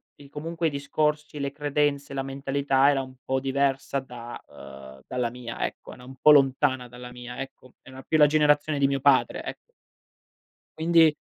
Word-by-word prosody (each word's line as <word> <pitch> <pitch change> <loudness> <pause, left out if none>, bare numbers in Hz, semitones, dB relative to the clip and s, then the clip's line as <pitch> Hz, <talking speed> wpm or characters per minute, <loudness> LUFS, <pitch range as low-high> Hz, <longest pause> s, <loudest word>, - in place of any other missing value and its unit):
di 140 -1 -16
comunque 165 +3 -3
i - - +1
discorsi, 150 +1 -2
le 140 0 -2
credenze, 145 -1 -1
la 135 - -2
mentalità 135 0 +1
era 140 -2 +2
un 130 -1 -10
po' 130 0 0
diversa 135 0 0
da 120 -2 -9
uhm, 65 -1 -12
dalla 125 -2 -1
mia 120 -1 -5
ecco, - - -8
era 125 - -14
un 130 +1 -11
po' 150 - +8
lontana 135 -2 +3
dalla 125 0 -11
mia 125 0 -9
ecco. 135 -2 -10
Era 130 0 -12
più 160 - +1
la 150 - +8
generazione 150 0 +2
di 140 - +4
mio 135 0 -1
padre 135 0 +3
e - - -6 1.2
Quindi 160 -1 +5
140 Hz, 175 wpm, -26 LUFS, 130-145 Hz, 1.2 s, po